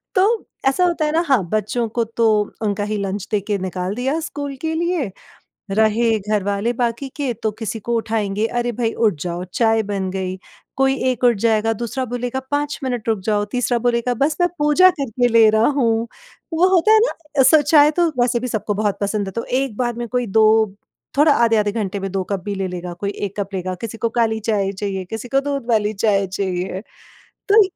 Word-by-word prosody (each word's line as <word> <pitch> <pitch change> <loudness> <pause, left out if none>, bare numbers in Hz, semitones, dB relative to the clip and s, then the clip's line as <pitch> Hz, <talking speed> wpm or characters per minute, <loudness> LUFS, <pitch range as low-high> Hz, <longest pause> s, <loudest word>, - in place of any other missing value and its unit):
तो 370 - +5 0.4
ऐसा 270 +7 +2
होता 340 -3 +1
है 300 - 0
ना 320 - +2
हाँ, 265 -8 +3
बच्चों 215 +3 -1
को 235 +1 0
तो 230 -1 +4 0.3
उनका 205 -2 -1
ही 215 - 0
लंच 195 0 -3
दे 210 - +2
के 205 - +1
निकाल 185 0 -3
दिया 265 +6 -1
स्कूल 285 -3 -5
के 320 0 -1
लिए। 340 - -1 0.6
रहे 220 +2 +2
घरवाले 205 +2 -1
बाकी 240 +2 -2
के 280 -5 -2
तो 220 - +2
किसी 225 0 -4
को 235 +3 -3
उठाएँगे 215 -2 -1
अरे 240 0 -1
भई 230 -2 0
उठ 220 -3 +2
जाओ, 175 +1 -3
चाय 225 -1 +2
बन 195 -2 -3
गई, 185 0 -3 0.4
कोई 270 0 +3 0.2
एक 250 0 -6
उठ 240 -1 +5
जाएगा, 225 0 +2
दूसरा 240 +4 -3
बोलेगा 245 +1 -3
5 290 0 -1
मिनट 245 -4 -3
रुक 220 - +1
जाओ, 205 -1 +1
तीसरा 245 -1 +1
बोलेगा 240 +1 +1
बस 280 +6 0
मैं 350 - +3
पूजा 300 +5 +5
करके 245 -2 +1
ले 230 -2 +6
रहा 220 +1 +3
हूँ। 235 -5 +1 0.5
वो 340 +3 +4
होता 365 +5 +4
है 440 - +7
ना? 305 - 0
सो 295 +4 +6
चाय 295 0 +5
तो 345 +2 +2
वैसे 245 0 +2
भी 250 - -3
सबको 215 -3 -2
बहुत 205 -1 -1
पसंद 200 0 -1
है 195 - -5
तो 230 - -2 0.2
1 270 -6 -4
बार 240 -1 0
में 240 0 -4
कोई 245 +1 -1
2 220 0 +3 0.4
थोड़ा 295 +1 +6
आधे-आधे 225 -4 +2
घंटे 200 -2 -3
में 195 0 -4
2 190 -1 -1
कप 200 -1 -1
भी 205 - -3
ले 190 -1 -2
लेगा 180 -1 -6
कोई 200 - -1 0.2
एक 195 - -6
कप 200 -1 -2
लेगा 185 -1 -3
किसी 225 -1 -5
को 230 +1 -1
काली 225 -2 0
चाय 205 -3 0
चाहिए, 195 -1 -4
किसी 225 +5 -6
को 270 - +3
दूध 280 -2 -3
वाली 215 -2 +2
चाय 200 -1 +1
चाहिए। 185 -1 -3 0.7
तो 425 +1 +7
225 Hz, 210 wpm, -20 LUFS, 205-260 Hz, 0.7 s, है